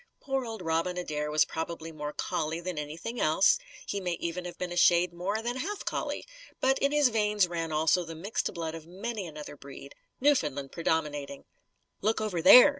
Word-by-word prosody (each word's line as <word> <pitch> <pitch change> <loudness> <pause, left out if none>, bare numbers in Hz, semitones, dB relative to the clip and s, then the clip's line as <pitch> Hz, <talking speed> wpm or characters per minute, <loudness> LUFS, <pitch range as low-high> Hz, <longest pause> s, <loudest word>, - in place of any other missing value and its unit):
Poor 270 -1 -1
old 225 -5 -6
Robin 165 +2 0
Adair 150 -4 -2
was 150 0 +4
probably 165 0 -5
more 150 -1 -5
collie 160 +2 -2
than 175 -2 -4
anything 165 +11 -5
else; 185 - +4 0.3
he 200 - -3
may 180 -2 -1
even 170 +1 -3
have 175 - -7
been 180 -1 -3
a - - -4
shade 175 0 +5
more 200 +6 -2
than 240 +2 -2
half 405 +10 -4
collie. - - -2 0.3
But 265 +1 +3
in 280 - +2
his 295 -3 +5
veins 210 -4 +2
ran 165 -2 -3
also 160 +3 +3
the 165 -1 -8
mixed 195 +7 -2
blood 165 -2 -4
of 165 -1 -9
many 200 +2 -4
another 150 -2 -8
breed, 140 0 -11 0.3
Newfoundland 150 - +2
predominating. 145 -4 -2 0.6
"Look 220 +3 +2
over 210 -6 -1
there!" 250 - +10
175 Hz, 190 wpm, -29 LUFS, 160-210 Hz, 0.6 s, there